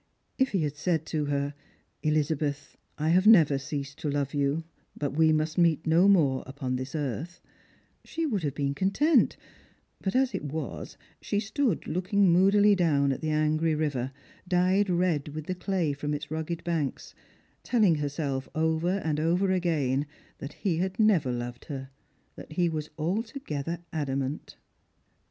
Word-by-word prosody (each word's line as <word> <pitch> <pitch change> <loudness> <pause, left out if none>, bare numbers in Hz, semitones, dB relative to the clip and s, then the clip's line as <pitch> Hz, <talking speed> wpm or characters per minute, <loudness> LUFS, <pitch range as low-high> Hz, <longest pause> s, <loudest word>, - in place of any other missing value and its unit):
If 265 0 +3
he 190 -6 0
had 150 -1 -2
said 160 +1 -1
to 155 -2 -2
her, 140 0 -1 0.3
" - - -43
Elizabeth, 150 -1 -1 0.2
I 155 +1 0
have 185 +4 +4
never 155 -10 +6
ceased 140 0 -5
to 150 - -2
love 140 -1 -1
you 145 +2 0 0.3
— 145 -2 -3
we 160 0 +4
must 155 +2 0
meet 165 -2 +3
no 165 +4 +4
more 150 -10 +4
upon 135 -2 -3
this 130 +4 -5
earth 150 - -4 0.2
" - - -32
— - - -41
she 330 0 -3
would 220 - -1
have 145 -4 -2
been 140 -1 -1
content; 235 - +2 0.6
but, 190 - -2
as 260 0 +2
it - - -3
was, 150 -1 -5 0.2
she 205 - -1
stood 220 - -1
looking 185 +3 +2
moodily 200 +4 +5
down 150 -7 +2
at 135 - -3
the 155 - -2
angry 155 +1 +1
river, 140 -4 -1 0.4
dyed 185 +2 +2
red 175 -5 +1
with 155 -1 -5
the 185 - -2
clay 180 -4 -1
from 150 +1 -3
its 150 +1 -7
rugged 160 +1 -3
banks, 160 -5 -2 0.5
telling 215 -8 +3
herself 145 -3 -2
over 160 +4 +1
and 150 -2 0
over 175 +5 +2
again 150 -7 0 0.3
that 140 +2 -7
he 180 -5 -1
had 185 +4 -2
never 190 - +3
loved 120 0 -5
her, 135 -2 -7 0.4
that - - -10
he 175 +2 +2
was 155 -2 -3
altogether 170 - -3 0.2
adamant. 140 -2 -3
155 Hz, 165 wpm, -28 LUFS, 145-180 Hz, 0.6 s, never